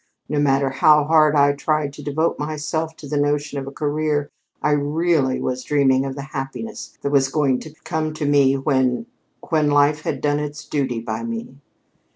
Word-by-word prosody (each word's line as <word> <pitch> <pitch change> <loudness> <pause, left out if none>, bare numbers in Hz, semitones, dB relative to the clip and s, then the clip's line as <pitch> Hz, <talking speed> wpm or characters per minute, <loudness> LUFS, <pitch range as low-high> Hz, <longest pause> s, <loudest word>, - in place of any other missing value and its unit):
No 150 - -1
matter 135 -1 +2
how 150 +3 +5
hard 155 0 +4
I 145 0 +5
tried 145 0 -1
to 150 - -10
devote 150 +3 -1
myself 155 +2 -3
to 150 - -11
the 145 +1 -1
notion 145 0 0
of 135 - -7
a - - -5
career, 150 0 -1 0.3
I 150 - +1
really 145 -1 +1
was 130 0 -3
dreaming 135 -2 +2
of 135 - -5
the 140 - -6
happiness 135 +11 -6
that 140 - -1
was 135 -2 +4
going 135 -3 +1
to 155 -1 -11
come 155 -1 -2
to 155 - -3
me 140 -2 +4
when 130 - +1 0.4
when 155 -3 +2
Life 145 +1 +3
had 140 -3 -3
done 145 +1 +1
its 150 0 -5
duty 135 -5 -1
by 110 -1 -4
me." 115 +3 -6
145 Hz, 190 wpm, -21 LUFS, 135-150 Hz, 0.4 s, how